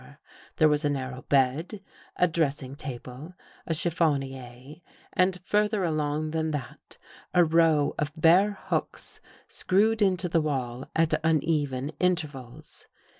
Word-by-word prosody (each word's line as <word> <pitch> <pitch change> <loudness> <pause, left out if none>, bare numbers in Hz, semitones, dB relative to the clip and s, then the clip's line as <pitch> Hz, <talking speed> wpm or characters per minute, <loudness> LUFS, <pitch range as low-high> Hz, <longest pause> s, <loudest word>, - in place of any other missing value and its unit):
There 155 - +4
was 150 0 +1
a 145 - +1
narrow 130 -2 -4
bed, 140 - 0 0.4
a 180 - +3
dressing 145 -5 -2
table, 135 +3 -8 0.3
a 165 - 0
chif 165 +1 +1
fonier, 135 -2 -3 0.3
and 185 0 +1
further 210 0 +1
along 155 -1 -1
than 160 0 -1
that, 145 -5 -7 0.4
a 175 -1 +6
row 160 -2 +3
of 150 0 -1
bare 185 +6 +4
hooks - - -4 0.3
screwed 215 +4 +1
into 185 -3 +2
the 165 -1 +1
wall 130 -4 -3
at 160 -1 +2
uneven 150 -4 0
intervals. 150 -9 -3
155 Hz, 125 wpm, -27 LUFS, 135-170 Hz, 0.4 s, a